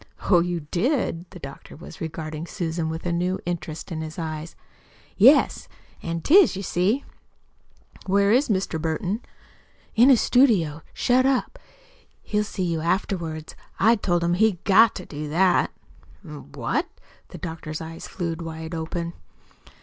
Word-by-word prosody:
"Oh, 180 Hz, -, +7 dB
you 175 Hz, 0 st, -1 dB
did!" 185 Hz, -, 0 dB
The 185 Hz, -, -11 dB
doctor 140 Hz, -5 st, -10 dB
was 165 Hz, +1 st, -12 dB
regarding 160 Hz, 0 st, -5 dB
Susan 165 Hz, -2 st, -3 dB
with 160 Hz, +2 st, -5 dB
a 175 Hz, -, 0 dB
new 180 Hz, +2 st, 0 dB
interest 170 Hz, -1 st, -5 dB
in 160 Hz, -1 st, -3 dB
his 155 Hz, -1 st, -7 dB
eyes. 160 Hz, -1 st, -5 dB, 0.6 s
"Yes, -, -, +5 dB, 0.3 s
an' 165 Hz, 0 st, -3 dB
'tis, 355 Hz, -, +6 dB
you 195 Hz, -, -5 dB
see." 195 Hz, +10 st, 0 dB, 1.0 s
"Where 200 Hz, +1 st, +3 dB
is 255 Hz, +5 st, +3 dB
Mr. 190 Hz, -5 st, -1 dB
Burton?" 175 Hz, +7 st, -2 dB, 0.7 s
"In 240 Hz, +4 st, +6 dB
his 255 Hz, -4 st, +6 dB
studio 190 Hz, -, +3 dB
shut 255 Hz, +1 st, +2 dB
up. 270 Hz, -, 0 dB, 0.6 s
He'll 210 Hz, 0 st, 0 dB
see 200 Hz, -2 st, -4 dB
you 165 Hz, -2 st, -1 dB
afterwards. 165 Hz, -3 st, -2 dB, 0.2 s
I 225 Hz, +3 st, +5 dB
told 175 Hz, -5 st, 0 dB
him 170 Hz, 0 st, +2 dB
he'd 195 Hz, -1 st, +2 dB
GOT 220 Hz, +3 st, +5 dB
to 185 Hz, -, -7 dB
do 150 Hz, 0 st, -6 dB
that." 180 Hz, +4 st, +3 dB, 0.6 s
"Eh? -, -, -9 dB
What?" 145 Hz, -, -3 dB, 0.4 s
The -, -, -10 dB
doctor's 160 Hz, -2 st, -6 dB
eyes 165 Hz, 0 st, -8 dB
flew 170 Hz, -3 st, -3 dB
wide 160 Hz, 0 st, -6 dB
open. 170 Hz, +1 st, -4 dB
175 Hz, 150 wpm, -24 LUFS, 160-200 Hz, 1.0 s, Oh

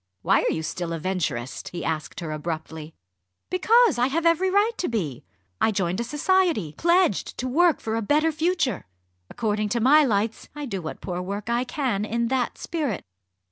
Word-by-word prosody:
"Why -, -, +4 dB
are -, -, +1 dB
you 160 Hz, -, -2 dB
still 170 Hz, +1 st, -3 dB
a -, -, -2 dB
Venturist?" 155 Hz, -9 st, -3 dB
he 175 Hz, -, -5 dB
asked 160 Hz, +2 st, -3 dB
her 160 Hz, -2 st, -4 dB
abruptly. 160 Hz, 0 st, -5 dB, 0.6 s
"Because 435 Hz, -, +4 dB
I 245 Hz, -, +4 dB
have 325 Hz, +5 st, -1 dB
every 335 Hz, +3 st, +3 dB
right 405 Hz, +4 st, +3 dB
to 360 Hz, -, 0 dB
be! 165 Hz, -, -3 dB, 0.4 s
I -, -, +4 dB
joined 190 Hz, -2 st, -1 dB
a -, -, 0 dB
society, 295 Hz, -, +1 dB
pledged 345 Hz, -, +2 dB
to 255 Hz, -, -2 dB
work 330 Hz, +5 st, +3 dB
'for 220 Hz, 0 st, -3 dB
a 225 Hz, -, 0 dB
better 300 Hz, +8 st, +2 dB
future.' 315 Hz, -, 0 dB, 0.4 s
According 215 Hz, -2 st, -1 dB
to 235 Hz, -, 0 dB
my 290 Hz, +6 st, +6 dB
lights, 220 Hz, -3 st, -1 dB
I 295 Hz, -1 st, -5 dB
do 195 Hz, -8 st, -4 dB
what 160 Hz, -, -7 dB
poor 180 Hz, -2 st, -4 dB
work 200 Hz, +4 st, -4 dB
I 240 Hz, +2 st, +1 dB
can 250 Hz, -7 st, -1 dB
in 235 Hz, +2 st, -1 dB
that 255 Hz, -2 st, -1 dB
spirit." 295 Hz, -, -3 dB
230 Hz, 185 wpm, -25 LUFS, -, 0.6 s, my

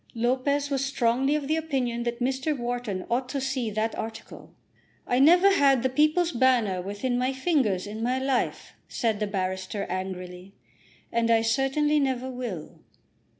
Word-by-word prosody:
Lopez 265 Hz, +5 st, 0 dB
was 275 Hz, -1 st, 0 dB
strongly 270 Hz, +1 st, +1 dB
of 295 Hz, -2 st, -2 dB
the 310 Hz, -, +1 dB
opinion 260 Hz, -7 st, -1 dB
that 240 Hz, 0 st, -3 dB
Mr. 265 Hz, +3 st, -1 dB
Wharton 240 Hz, -6 st, -3 dB
ought 250 Hz, +2 st, -1 dB
to 275 Hz, -, -2 dB
see 265 Hz, -3 st, -2 dB
that 215 Hz, +2 st, -1 dB
article. 225 Hz, 0 st, -8 dB, 0.5 s
"I 245 Hz, -, +1 dB
never 350 Hz, +7 st, +6 dB
had 275 Hz, -8 st, +4 dB
the 260 Hz, -, +2 dB
'People's 310 Hz, +5 st, +2 dB
Banner' 235 Hz, -, +2 dB
within 205 Hz, +6 st, -2 dB
my 255 Hz, +1 st, +1 dB
fingers 260 Hz, -, +1 dB
in 215 Hz, +2 st, -6 dB
my 250 Hz, +3 st, 0 dB
life," 265 Hz, -1 st, -1 dB
said 225 Hz, -4 st, -1 dB
the 210 Hz, -, -1 dB
barrister 190 Hz, 0 st, -3 dB
angrily, 185 Hz, 0 st, -6 dB, 0.6 s
"and 230 Hz, 0 st, +1 dB
I 225 Hz, -1 st, +4 dB
certainly 270 Hz, +6 st, +2 dB
never 260 Hz, -2 st, -1 dB
will." 240 Hz, -11 st, -6 dB
250 Hz, 155 wpm, -26 LUFS, 220-270 Hz, 0.6 s, never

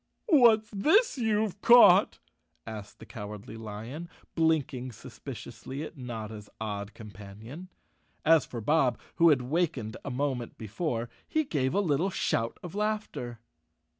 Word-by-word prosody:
"What's 235 Hz, -, +5 dB
this 315 Hz, -, +3 dB
you've 215 Hz, -3 st, 0 dB
caught?" 225 Hz, -5 st, +7 dB, 0.5 s
asked 105 Hz, -2 st, -8 dB
the 110 Hz, -, -12 dB
Cowardly 105 Hz, +1 st, -8 dB
Lion, 115 Hz, +9 st, -7 dB, 0.2 s
blinking 145 Hz, -6 st, 0 dB
suspiciously 125 Hz, +2 st, -8 dB
at 160 Hz, -, -8 dB
Notta's 110 Hz, -5 st, -7 dB
odd 105 Hz, -1 st, -5 dB
companion. 110 Hz, -, -10 dB, 0.6 s
As 160 Hz, -3 st, +6 dB
for 120 Hz, -3 st, -7 dB
Bob, 135 Hz, 0 st, +2 dB, 0.2 s
who 170 Hz, 0 st, +6 dB
had 135 Hz, -5 st, +3 dB
wakened 130 Hz, -6 st, -1 dB
a -, -, -4 dB
moment 130 Hz, -2 st, -2 dB
before, 115 Hz, -, -3 dB, 0.2 s
he 315 Hz, -, +1 dB
gave 140 Hz, -, -1 dB
a -, -, +3 dB
little 170 Hz, +1 st, +1 dB
shout 115 Hz, -10 st, -1 dB
of 175 Hz, -, -7 dB
laughter. 210 Hz, -, -3 dB
130 Hz, 130 wpm, -29 LUFS, 110-180 Hz, 0.6 s, caught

